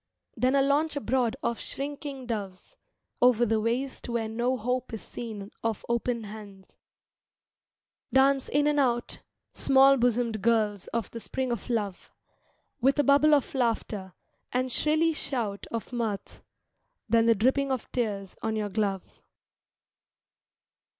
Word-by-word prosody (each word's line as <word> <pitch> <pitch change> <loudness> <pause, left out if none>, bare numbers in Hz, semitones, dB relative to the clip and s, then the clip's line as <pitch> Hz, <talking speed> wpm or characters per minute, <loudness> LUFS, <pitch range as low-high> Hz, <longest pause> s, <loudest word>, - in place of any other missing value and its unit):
Then 255 +2 +2
a 275 - +4
launch 295 +3 +2
abroad 260 -4 0
of 235 - -1
shrinking 280 -1 -5
doves 205 - -5 0.5
Over 245 -1 +5
the 220 -1 +1
waste 245 +4 -2
where 235 -2 -1
no 240 +4 0
hope 250 +3 -2
is 220 - -7
seen 215 -3 -7
Of 225 -2 -2
open 235 0 -1
hands: 205 -2 -11 1.4
Dance 270 0 +3
in 290 +1 +2
and 295 0 +2
out 240 -3 0 0.3
Small 275 0 +5
bosomed 235 -3 +1
girls 215 -3 +1
of 230 -4 -3
the 230 - -6
spring 260 +2 -3
of 235 +1 -4
love, 210 -6 -2 0.7
With 270 +4 +3
a 290 - +4
bubble 285 +2 +5
of 285 - -1
laughter, 220 -7 -1 0.4
and 255 +1 0
shrilly 315 +5 +2
shout 230 -9 -3
Of 230 +2 -5
mirth; 220 -5 -3 0.7
then 230 +1 +3
the 230 - +5
dripping 265 +6 +2
of 260 -3 -3
tears 205 -6 -2
on 220 0 -1
your 210 -1 -2
glove. 195 -2 -3
235 Hz, 135 wpm, -28 LUFS, 220-265 Hz, 1.4 s, Over